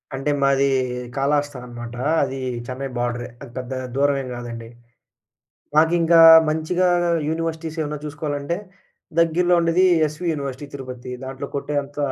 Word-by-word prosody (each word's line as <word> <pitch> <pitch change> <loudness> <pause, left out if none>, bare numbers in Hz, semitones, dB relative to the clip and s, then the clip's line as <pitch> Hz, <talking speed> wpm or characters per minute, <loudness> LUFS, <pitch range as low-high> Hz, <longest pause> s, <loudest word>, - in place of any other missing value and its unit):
అంటే 135 +2 -1
మాది 140 0 +3 0.5
కళాహస్తా 145 0 0
అనమాట 120 0 -8 0.3
అది 135 -1 -1 0.3
చెన్నై 130 +2 -4
బోర్డరే. 120 0 -2
అది 140 -4 -10
పెద్దగా 130 0 -4
దూరమే 140 0 +2
గాదండి. 115 -1 -7 1.1
మాకింకా 165 +1 +4 0.3
మంచిగా 160 +4 +1 0.4
యూనివర్సిటీస్ 160 0 -3
ఏమన్నా 150 0 -3
చూసుకోవాలంటే 150 +1 -3 0.6
దగ్గరలో 175 +2 +3
ఉండేది 170 +3 +3 0.2
'ఎస్వీ 150 +4 -6
యూనివర్సిటీ 140 -1 -5
తిరుపతి.' 130 -2 -7
దాంట్లో 135 +1 -6
కొట్టే 145 +1 -3
అంత 145 +1 -16
145 Hz, 120 wpm, -22 LUFS, 130-160 Hz, 1.1 s, మాకింకా